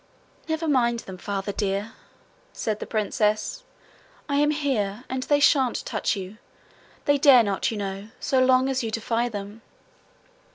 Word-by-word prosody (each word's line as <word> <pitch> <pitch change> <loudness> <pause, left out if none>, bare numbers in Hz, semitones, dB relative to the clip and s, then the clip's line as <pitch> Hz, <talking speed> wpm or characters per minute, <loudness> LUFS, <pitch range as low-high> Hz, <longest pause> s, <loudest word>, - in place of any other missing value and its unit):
'Never 320 0 -2
mind 240 -5 +2
them, 185 -1 -10
Father 200 0 -3
dear,' 200 +1 -2 0.6
said 215 -1 -2
the - - -6
princess. 215 - 0 0.7
'I 280 - 0
am 295 +1 +3
here, 250 -8 -1
and 260 0 -2
they 290 +2 +2
shan't 270 -4 +3
touch - - -1
you. 195 +2 -8 0.7
They 285 0 +3
dare 270 -4 +7
not, 200 -2 0
you 225 - -4
know, 195 0 -5
so 260 -1 +2
long 255 0 +4
as 265 -1 0
you 225 - -3
defy 230 +2 -1
them.' 205 0 -7
230 Hz, 155 wpm, -25 LUFS, 205-265 Hz, 0.7 s, dare